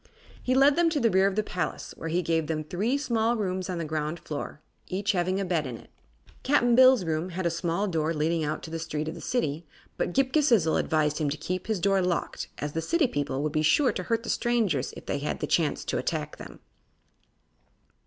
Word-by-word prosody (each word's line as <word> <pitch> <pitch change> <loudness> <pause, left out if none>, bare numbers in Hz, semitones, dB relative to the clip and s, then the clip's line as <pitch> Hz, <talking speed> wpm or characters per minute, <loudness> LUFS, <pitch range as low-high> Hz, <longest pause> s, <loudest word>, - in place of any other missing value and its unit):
He 255 - 0
led 275 +2 +6
them 345 -1 +4
to 315 -2 0
the 230 -4 +3
rear 190 +1 +4
of 195 - -1
the 215 - +1
palace, 180 -3 -4
where 165 - -5
he 175 +3 0
gave 165 -1 0
them 155 -1 -2
three 205 - -1
small 235 -4 +1
rooms 185 -3 -2
on 180 - -2
the 165 - -3
ground 155 +1 -3
floor, 150 -3 -6 0.3
each 200 +2 0
having 185 0 0
a 195 - -1
bed 165 -5 0
in 120 -2 -6
it. - - -17 0.5
Cap'n 245 -3 +3
Bill's 255 -4 +6
room 160 +2 -1
had 185 +1 -4
a 170 - +2
small 170 +4 -1
door 160 -3 0
leading 160 +1 0
out 150 0 -1
into 160 - -10
the 165 - -3
street 155 -1 -3
of - - -5
the 170 - -9
City, 160 - -1 0.3
but - - -1
Ghip 265 +4 +1
Ghisizzle 235 - +3
advised 150 -1 +1
him 150 -2 +1
to 150 - -3
keep 185 +4 -4
this 220 -2 0
door 195 +1 +2
locked, 180 -1 -2
as 145 0 -4
the 165 - -1
city 335 - +2
people 145 - -2
would 155 - -1
be 155 - +2
sure 245 - +4
to - - -4
hurt 230 -1 -1
the - - -6
strangers 220 - +1
if - - -11
they - - -2
had - - -3
the - - -1
chance - - 0
to - - -1
attack - - -3
them. - - -11
180 Hz, 230 wpm, -27 LUFS, 155-225 Hz, 0.5 s, led